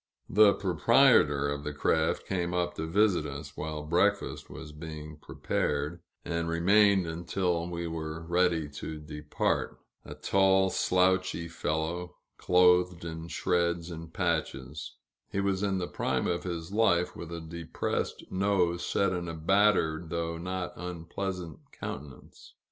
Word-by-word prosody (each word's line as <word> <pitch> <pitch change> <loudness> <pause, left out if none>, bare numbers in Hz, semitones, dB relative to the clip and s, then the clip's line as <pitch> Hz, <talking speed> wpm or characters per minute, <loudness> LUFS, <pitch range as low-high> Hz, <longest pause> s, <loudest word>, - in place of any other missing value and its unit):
The 105 0 +6
proprietor 75 -5 +4
of 70 0 -3
the 75 0 -5
craft 80 +2 +1
came 90 -2 -2
up 85 0 0
to 80 - -4
visit 95 -3 +2
us, 70 +1 -8
while 75 0 -4
breakfast 90 +6 0
was 80 -2 -9
being 75 -1 -8
prepared, 75 +2 -2 0.2
and 85 -1 -2
remained 95 +3 +4
until 85 +1 -1
we 85 0 -4
were 80 0 -5
ready 85 -2 +2
to 75 +2 -7
depart 75 0 -2 0.3
a 75 - -9
tall, 95 +4 +3
slouchy 90 -2 +2
fellow, 80 +2 -3 0.2
clothed 90 -1 +4
in 80 0 -6
shreds 85 0 0
and 80 0 -8
patches; 80 -5 -2 0.3
he 100 - -2
was 100 -1 0
in 100 -2 0
the 90 -1 -2
prime - - -1
of 85 +1 -1 0.3
life, 95 -5 +2
with 85 0 -8
a 85 - -4
depressed 80 0 -3
nose 95 -3 +1
set 100 +1 +1
in 90 -1 -3
a 85 - -4
battered, 85 -2 +2
though 85 0 -2
not 90 0 -4
unpleasant 90 0 -5
countenance. 70 -1 -9
85 Hz, 135 wpm, -29 LUFS, 80-90 Hz, 0.3 s, The